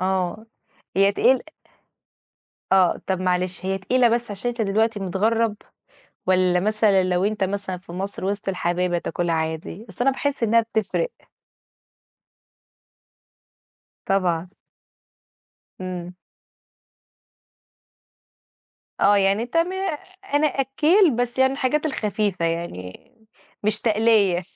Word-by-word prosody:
آه، 190 +3 -1 0.5
هي 195 +1 +4
تقيل 255 +5 +3 1.3
آه، 185 -2 +4
طَب 190 -1 -1
معلش 185 0 -1
هي 195 0 -1
تقيلة 245 +5 +3
بس 235 0 -1
عشان 205 +4 -3
أنت 240 -1 -4
دلوقتي 220 +1 +1
متغرّب، 210 +4 0 0.7
والّا 185 -1 +3
مثلًا 210 -1 +3
لو 180 0 +1
أنت 210 -1 0
مثلًا 190 -1 -3
في 180 -1 -13
مصر 190 +2 -5
وِسط 200 +1 -2
الحبايب 180 -1 -1
هتاكلها 170 0 -1
عادي؟ 160 +6 -4
أصل 195 - -15
أنا 270 - +5
باحس 280 0 -2
إنّها 230 +1 +4
بتفرِق. 225 - -2 2.9
طبعًا. 180 -3 0 1.3
إمم. 180 -1 -5 2.9
آه 205 +1 +5
يعني 195 +2 +2
أنت 240 +7 -5
م 335 +2 +2 0.6
أنا 295 +1 +4
أكّيل 300 - +3
بس 245 +1 -2
يعني 265 0 +4
الحاجات 280 +3 0
الخفيفة 210 - -1
يعني 165 - -5 0.5
مش 210 0 +2
تَقليّة. 210 -5 +3
200 Hz, 110 wpm, -23 LUFS, 185-230 Hz, 2.9 s, أنا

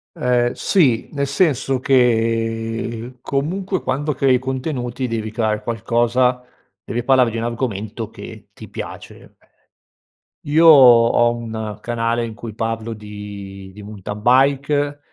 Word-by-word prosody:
Ehm, 125 -1 +1
sì, 135 - +1
nel 140 -1 -1
senso 140 -3 +1
che 115 -1 0
comunque 185 +7 -2
quando 145 +2 -2
crei 130 -1 +3
contenuti 130 -1 -3
devi 110 -2 -4
creare 110 -1 -1
qualcosa, 120 +2 0 0.4
devi 120 +2 -4
parlare 130 -3 +3
di 115 - -4
un 115 - -3
argomento 115 -2 -4
che 105 -3 -11
ti 110 - -12
piace. - - -10 1.1
Io 160 +3 +3
ho 120 -4 +7
un 110 -3 -6
canale 115 0 -1
in 115 - -7
cui 115 -1 -8
parlo 115 0 -3
di 100 -2 -9
di 105 - -11
mountain 105 0 -8
bike 140 +4 +2
120 Hz, 125 wpm, -19 LUFS, 110-130 Hz, 1.1 s, ho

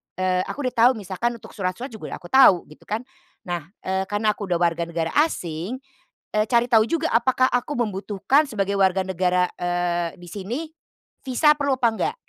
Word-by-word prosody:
eee, 185 0 +1
aku 290 - -5
udah - - -35
tahu - - +5
misalkan 215 +3 -3
untuk 230 - -13
surat-surat 195 +7 -4
juga 220 - -7
udah - - -8
aku 175 - -13
tahu, 260 -10 +7
gitu 150 - -17
kan. 220 +3 -2 0.4
Nah, 175 -6 -4 0.2
eee, 190 0 -1
karena 205 +2 +1
aku 205 -1 -6
udah 180 - +1
warga 170 -1 +1
negara 165 -1 -2
asing, 185 - -1 0.6
eee, 215 0 +3
cari 240 -1 +3
tahu 225 -3 +5
juga 330 -1 0
apakah 255 +2 +3
aku 245 +4 -1
membutuhkan 210 +5 +1
sebagai 200 -2 -1
warga 190 -1 +3
negara, 180 0 +1
eee, 175 -1 -1
di 175 - -12
sini 205 - -4 0.7
visa 270 +4 +4
perlu 280 -2 +1
apa 240 - +4
enggak 420 - -2
200 Hz, 185 wpm, -23 LUFS, 180-240 Hz, 0.7 s, tahu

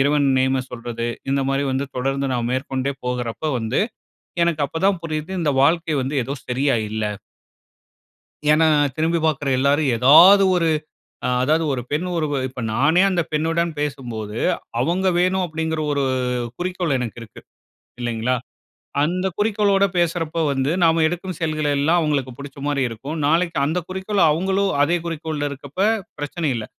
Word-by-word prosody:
இறைவன் 145 0 +3
நேம 130 0 +1
சொல்றது, 115 -1 -5 0.2
இந்த 140 0 +1
மாரி 135 +1 0
வந்து 135 +2 -1
தொடர்ந்து 135 +2 -1
நான் 120 -1 -1
மேற்கொண்டே 130 +1 -2
போகுறப்ப 125 +2 -3
வந்து, 115 +2 -1 0.6
எனக்கு 165 -3 +1
அப்ப 160 - -5
தான் 195 -3 +1
புரியுது 155 +1 -4
இந்த 150 -3 +1
வாழ்க்கை 165 +1 +2
வந்து 135 +3 -3
ஏதோ 135 - -4
சரியா 135 +2 +1 0.2
இல்ல. 110 0 -2 1.5
ஏன்னா, 160 +1 +4 0.3
திரும்பி 165 +2 +1
பாக்குற 150 -2 0
எல்லாரும், 140 +2 +2
ஏதாவது 165 - +8
ஒரு 165 -1 +1 0.6
அ - - 0
அதாவது 155 +5 +2
ஒரு 125 - -2
பெண் 150 +4 -1
ஒருவ 155 -3 -1 0.2
இப்ப 125 0 -8
நானே 150 +9 +3
அந்த 175 -2 +1
பெண்ணுடன் 165 +2 0
பேசும்போது, 120 -7 -4 0.4
அவுங்க 180 +8 +1
வேணும், 185 +1 +2
அப்பிடிங்கிற 160 -1 -2
ஒரு 140 -1 0 0.5
குறிக்கோள் 180 -4 -1
எனக்கு 120 -2 -5
இருக்கு. 110 - -12 0.6
இல்லங்களா? 120 +1 -1 0.7
அந்த 180 +5 0
குறிக்கோளோட 205 -2 +2
பேசுறப்ப 165 -1 0
வந்து, 135 +1 0
நாம 165 0 +4
எடுக்கும் 175 +1 -4
செயல்கள் 155 -2 -1
எல்லாம் 160 +5 +3
அவுங்களுக்கு 140 -5 -1
புடிச்சமாரி 140 0 -3
இருக்கும். 135 +8 -6
நாளைக்கு 170 +3 +1
அந்த 160 +5 -1
குறிக்கோள் 190 +2 -1
அவுங்களும் 190 +4 +1
அதே 170 +4 +2
குறிக்கோள்ல 155 -3 -3
இருக்கப்ப, 140 +3 -10 0.4
பிரச்சனை 145 +2 -2
இல்ல. 110 -2 -4
150 Hz, 145 wpm, -21 LUFS, 135-170 Hz, 1.5 s, ஏதாவது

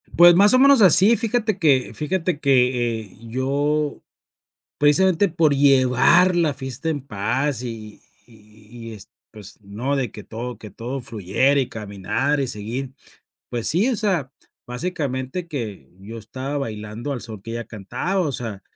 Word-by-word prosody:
Pues, 175 0 +8
más 205 +5 +6
o 255 - +5
menos 275 -3 +6
así, 195 +5 +6
fíjate 220 -3 0
que 140 -6 +2
fíjate 170 0 -2
que, 125 -4 +1
eh, 100 -2 -12
yo 145 +4 -1 0.8
precisamente 185 +6 +3
por 160 -3 +2
llevar 140 +6 +4
la 160 -4 +2
fiesta 135 +3 -5
en 150 -3 -1
paz 125 +3 -2
y 110 -3 -8 0.3
y 110 +1 -13
y - - -7
es, 105 -3 -10 0.2
pues, 105 -3 -11
no, 120 +8 -3
de 125 -6 -2
que 105 - -11
todo 120 0 -7
que 105 -3 -11
todo 125 +6 -6
fluyera, 120 +4 +1
y 130 - -2
caminar 105 +7 -2
y 135 - 0
seguir, 120 +5 -5 0.6
pues 120 -2 -1
sí, 195 +10 +2
o 245 - 0
sea, 175 - -1 0.3
básicamente 135 +2 -4
que 110 - -6
yo 115 +3 -9
estaba 130 +6 -5
bailando 110 +2 -5
al 125 - -5
son 110 -4 -8
que 115 - -7
ella 115 0 -4
cantaba, 120 - -3
o 145 -4 -2
sea, 110 -6 -5
130 Hz, 160 wpm, -22 LUFS, 115-155 Hz, 0.8 s, Pues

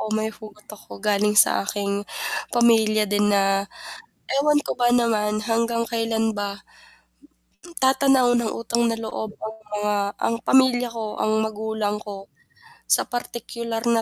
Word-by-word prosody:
oh, 215 - -4
may 220 0 -1
hugot 210 -1 -13
ako - - -16
galing 210 0 +2
sa - - -2
aking 200 0 -2 0.6
pamilya 220 -3 +4
din 205 0 +3
na 200 -1 +4 1.0
ewan 295 +1 +3
ko - - -2
ba 240 - +5
naman 210 -3 +1 0.2
hanggang 230 +1 +1
kailan 225 -1 0
ba, 200 0 -2 1.3
tatanaw 265 -1 +4
ng 230 -2 -1
utang 235 +1 0
na 230 -1 0
loob 220 0 -4
ang 220 0 -5 0.2
mga 210 0 0 0.3
ang 230 - +1
pamilya 255 -2 +4
ko, 225 - -3 0.2
ang 215 - +1
magulang 220 -1 -2
ko, 205 -1 -6 0.8
sa - - 0
partikular 235 -1 -4
na 225 - +2
225 Hz, 140 wpm, -23 LUFS, 210-235 Hz, 1.3 s, ba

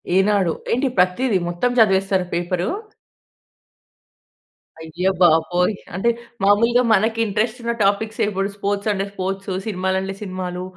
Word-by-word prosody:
ఈనాడు. 190 -3 +3 0.2
ఏంటి 255 +4 +1
ప్రతిది 190 +5 +2
మొత్తం 175 +8 0
చదివేస్తారా 195 -3 +3
పేపరు? 175 +1 -1 2.1
అయ్య 165 +3 -3
బాబోయ్! 175 +3 +3 0.2
అంటే 195 +6 +1 0.3
మామూలుగా 230 +5 +4
మనకి 220 +2 +1
ఇంట్రెస్ట్ 220 +3 -1
ఉన్న 235 0 0
టాపిక్సే 210 +3 0
ఇప్పుడు 195 -1 -2
స్పోర్ట్స్ 200 +1 -2
అంటే 195 0 -2
స్పోర్ట్సు 195 0 -3
సినిమాలు 190 -2 -1
అంటే 195 0 -5
సినిమాలు, 185 -2 -5
195 Hz, 115 wpm, -21 LUFS, 180-215 Hz, 2.1 s, మామూలుగా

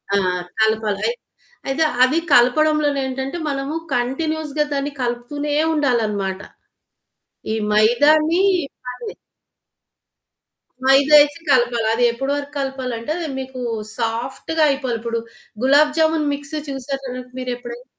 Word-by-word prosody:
ఆ! - - +4 0.4
కలపాలి. 220 - +1 0.6
అయితే 280 +4 +1 0.2
అది 275 +6 +3
కలపడంలోనే 290 +3 +4
ఏంటంటే 265 +5 -4
మనము 275 +2 -3 0.2
కంటిన్యూయస్‌గా 300 +4 -1
దాన్ని 280 +1 -2
కలుపుతూనే 250 +5 -3 0.2
ఉండాలన్నమాట. 215 -9 0 1.1
ఈ - - 0 0.2
మైదాని 300 - +4 2.4
మైదా 275 +3 +6
వేసి 290 +2 0
కలపాలి. 240 -3 +3
అది 245 - +1
ఎప్పటి 270 +4 -3
వరకు 285 0 -5
కలపాలి 265 -2 -3
అంటే 265 +7 -3 0.3
మీకు 260 -1 -7 0.4
సాఫ్ట్‌గా 240 +7 -2
అయిపోవాలి. 260 -4 -1
ఇప్పుడు 230 0 -2 0.4
గులాబ్ 295 +3 +5
జామున్ 315 -2 +2
మిక్స్ 285 +2 -6
చూసారా 270 0 -5 0.3
మీరెప్పుడైనా? 245 -1 -6
270 Hz, 100 wpm, -20 LUFS, 240-295 Hz, 2.4 s, మైదా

